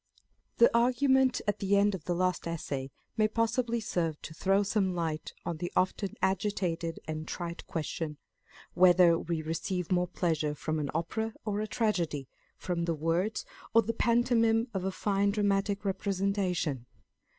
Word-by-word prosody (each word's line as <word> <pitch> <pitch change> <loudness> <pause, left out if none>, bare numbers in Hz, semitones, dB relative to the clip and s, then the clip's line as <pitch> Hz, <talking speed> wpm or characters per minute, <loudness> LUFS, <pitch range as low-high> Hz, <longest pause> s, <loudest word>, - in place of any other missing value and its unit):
THE 235 0 +5
argument 260 +2 +3
at 205 - 0
the 200 0 +2
end 205 +1 +3
of 180 -5 -6
the 175 - 0
last 185 -1 0
Essay 140 -5 -3 0.3
may 215 -1 +4
possibly 230 +2 0
serve 165 -7 -2
to 160 - -7
throw 195 +4 +2
some 195 -2 0
light 160 -3 -2
on 170 - -2
the 175 +2 -4
often 185 +1 0
agitated 180 -4 -1
and 155 0 -4
trite 170 -1 -5
question, 155 -1 -3 0.6
Whether 175 -2 +6
we 165 -2 -3
receive 170 +3 -3
more 180 0 +2
pleasure 160 -4 -1
from 155 +1 -2
an 145 -2 -2
Opera 220 +7 -2
or 210 -1 -1
a 215 - -2
Tragedy, 175 - -1 0.3
from 170 -2 -2
the 165 -1 0
words 165 +7 0 0.3
or 230 - +7
the 230 - -2
pantomime 230 0 +2
of 190 -2 -2
a 190 - 0
fine 200 +1 +1
dramatic 200 0 0
representation 190 - -1
185 Hz, 155 wpm, -30 LUFS, 165-210 Hz, 0.6 s, or